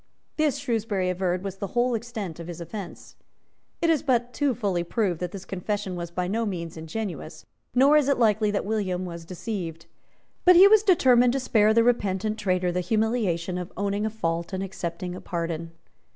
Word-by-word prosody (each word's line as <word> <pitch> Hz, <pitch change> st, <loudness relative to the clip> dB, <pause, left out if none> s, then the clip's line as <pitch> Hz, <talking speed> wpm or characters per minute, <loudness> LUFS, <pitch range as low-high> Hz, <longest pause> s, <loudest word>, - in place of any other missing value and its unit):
This, 305 Hz, -3 st, +1 dB
Shrewsbury 225 Hz, -8 st, -1 dB
averred, 180 Hz, 0 st, -1 dB
was 195 Hz, -1 st, -5 dB
the 200 Hz, +4 st, -6 dB
whole 245 Hz, +1 st, +3 dB
extent 220 Hz, -7 st, -5 dB
of 170 Hz, -, -7 dB
his 175 Hz, -1 st, -7 dB
offence. 180 Hz, +3 st, -8 dB, 0.7 s
It 335 Hz, -, +4 dB
is 315 Hz, -, +2 dB
but 245 Hz, -3 st, 0 dB
too 285 Hz, -4 st, +1 dB
fully 195 Hz, -7 st, -1 dB
proved 180 Hz, -2 st, -1 dB
that 180 Hz, -1 st, -3 dB
this 190 Hz, -1 st, -8 dB
confession 195 Hz, 0 st, -3 dB
was 170 Hz, -1 st, -5 dB
by 180 Hz, +1 st, -2 dB
no 225 Hz, +5 st, 0 dB
means 170 Hz, -6 st, -4 dB
ingenuous; 160 Hz, -1 st, -6 dB, 0.3 s
nor 275 Hz, +4 st, +6 dB
is 290 Hz, -2 st, +2 dB
it 280 Hz, -, +3 dB
likely 215 Hz, -2 st, +3 dB
that 205 Hz, -1 st, -1 dB
William 195 Hz, -4 st, -1 dB
was 170 Hz, -2 st, -7 dB
deceived. 175 Hz, -3 st, -5 dB, 0.6 s
But 360 Hz, 0 st, +7 dB
he 375 Hz, +3 st, +9 dB
was 430 Hz, 0 st, +6 dB
determined 250 Hz, -, +4 dB
to 270 Hz, -, 0 dB
spare 215 Hz, -4 st, +3 dB
the 230 Hz, +1 st, +4 dB
repentant 215 Hz, -2 st, 0 dB
traitor 185 Hz, -3 st, +1 dB
the 180 Hz, -, -1 dB
humiliation 185 Hz, -3 st, 0 dB
of 180 Hz, 0 st, -6 dB
owning 200 Hz, +1 st, -1 dB
a -, -, -1 dB
fault 170 Hz, -4 st, -3 dB
and 190 Hz, +1 st, -2 dB
accepting 180 Hz, -1 st, -5 dB
a 180 Hz, -, -8 dB
pardon. 165 Hz, -1 st, -4 dB
200 Hz, 190 wpm, -26 LUFS, 175-230 Hz, 0.7 s, he